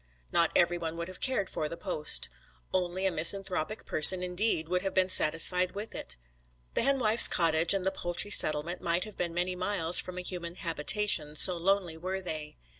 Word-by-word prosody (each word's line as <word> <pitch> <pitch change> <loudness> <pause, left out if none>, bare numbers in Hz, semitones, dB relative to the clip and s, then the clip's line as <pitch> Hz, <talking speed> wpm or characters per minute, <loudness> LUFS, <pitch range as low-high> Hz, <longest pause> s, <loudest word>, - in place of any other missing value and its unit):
Not 170 -1 +2
every 175 0 0
one 165 0 -7
would 170 0 -6
have 185 - -13
cared 255 -7 -3
for 155 -4 -5
the 170 - -8
post. 170 -5 +2 0.5
Only 185 +1 -3
a 190 - 0
misanthropic 185 +3 +1
person 180 +4 +5
indeed 180 -2 -2
would 180 +1 -2
have 195 0 -6
been 185 0 0
satisfied 180 +2 +2
with 205 +3 -9
it. - - -4 0.6
The - - -1
henwife's 240 -4 +5
cottage 165 -1 0
and 190 -1 -4
the 190 - -1
poultry 175 +4 -6
settlement 155 +1 +2
might 170 +1 -2
have 215 - -12
been 170 -1 -6
many 180 +1 -3
miles 180 -2 +4
from 180 0 -11
a - - -5
human 175 -1 -8
habitation, 165 -2 -2
so 180 +4 +5
lonely 175 -1 -2
were 185 +3 -6
they. 155 -5 -7
180 Hz, 190 wpm, -27 LUFS, 165-190 Hz, 0.6 s, person